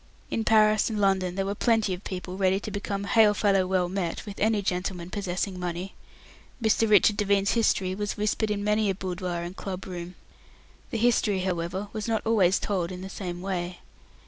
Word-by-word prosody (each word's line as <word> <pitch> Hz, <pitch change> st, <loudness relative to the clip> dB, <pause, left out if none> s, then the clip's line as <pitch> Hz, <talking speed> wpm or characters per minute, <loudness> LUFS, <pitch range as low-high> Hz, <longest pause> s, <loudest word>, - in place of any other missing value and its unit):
In 225 Hz, -, 0 dB
Paris 215 Hz, 0 st, +4 dB
and 215 Hz, -2 st, -2 dB
London 190 Hz, -3 st, +1 dB
there 195 Hz, 0 st, -1 dB
were 200 Hz, -, -1 dB
plenty 220 Hz, -2 st, +2 dB
of 180 Hz, +2 st, -7 dB
people 180 Hz, -1 st, -5 dB
ready 190 Hz, 0 st, +2 dB
to 215 Hz, -, -6 dB
become 200 Hz, 0 st, -3 dB
hail 210 Hz, +1 st, +4 dB
fellow 195 Hz, -3 st, +2 dB
well 185 Hz, -1 st, +1 dB
met 180 Hz, -2 st, -3 dB
with 205 Hz, -2 st, -8 dB
any 215 Hz, -1 st, +2 dB
gentleman 180 Hz, -1 st, -3 dB
possessing 190 Hz, -1 st, -3 dB
money. 180 Hz, +2 st, -4 dB, 0.7 s
Mr. 225 Hz, -1 st, +2 dB
Richard 210 Hz, 0 st, +5 dB
Devine's 200 Hz, -1 st, +2 dB
history 195 Hz, -5 st, +2 dB
was 205 Hz, +1 st, -3 dB
whispered 210 Hz, +1 st, 0 dB
in 205 Hz, -1 st, -1 dB
many 210 Hz, 0 st, +2 dB
a 195 Hz, -, 0 dB
boudoir 180 Hz, -2 st, -3 dB
and 175 Hz, +2 st, -6 dB
club 190 Hz, -1 st, -6 dB
room. 180 Hz, -1 st, -7 dB, 0.7 s
The -, -, -2 dB
history, 215 Hz, -4 st, +2 dB
however, 185 Hz, +2 st, -2 dB
was 215 Hz, -1 st, -4 dB
not 225 Hz, -1 st, 0 dB
always 195 Hz, -5 st, +4 dB
told 185 Hz, -4 st, -2 dB
in 180 Hz, 0 st, -7 dB
the 190 Hz, -, -7 dB
same 180 Hz, -2 st, -5 dB
way. 180 Hz, -2 st, -3 dB
195 Hz, 190 wpm, -27 LUFS, 180-210 Hz, 0.7 s, Richard